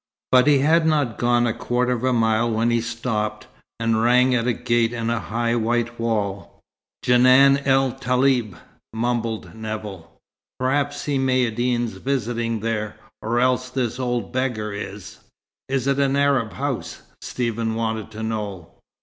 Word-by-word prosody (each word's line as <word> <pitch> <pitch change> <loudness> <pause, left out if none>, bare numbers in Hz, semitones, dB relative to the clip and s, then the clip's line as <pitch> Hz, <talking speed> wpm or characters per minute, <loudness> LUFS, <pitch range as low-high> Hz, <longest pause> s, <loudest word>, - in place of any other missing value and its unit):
But 130 +1 +5
he 145 -1 +6
had 160 +4 +3
not 145 -8 0
gone 120 0 +2
a 115 - 0
quarter 125 +1 -1
of 125 -1 -2
a 130 - +2
mile 115 -1 +2
when 115 +1 +1
he 120 -1 +2
stopped, 110 -2 -3 0.3
and 115 -1 +1
rang 125 +2 +4
at 120 -1 +1
a 125 - +2
gate 120 -1 0
in 115 -1 -2
a 115 - 0
high 115 +3 -1
white 120 +1 -1
wall. 105 -4 -2 0.4
"Djenan 130 +3 +6
el 135 -1 +3
Taleb," 125 -5 0 0.4
mumbled 115 -1 -2
Nevill. 110 -5 -7 0.5
"Perhaps 140 +3 0
Si 145 -2 -1
Maïeddine's 120 -3 0
visiting 115 -2 -2
there 110 -1 -2 0.3
or 115 +2 0
else 125 0 +1
this 125 -2 -2
old 120 -4 -2
beggar 120 -5 -2
is." 100 -1 -8 0.5
"Is 135 -2 -1
it 140 0 +1
an 140 -1 +2
Arab's 140 -8 +1
house?" - - -4 0.2
Stephen 115 -2 -2
wanted 110 -1 -2
to 110 0 -7
know. 105 -6 -4
120 Hz, 150 wpm, -22 LUFS, 110-130 Hz, 0.5 s, he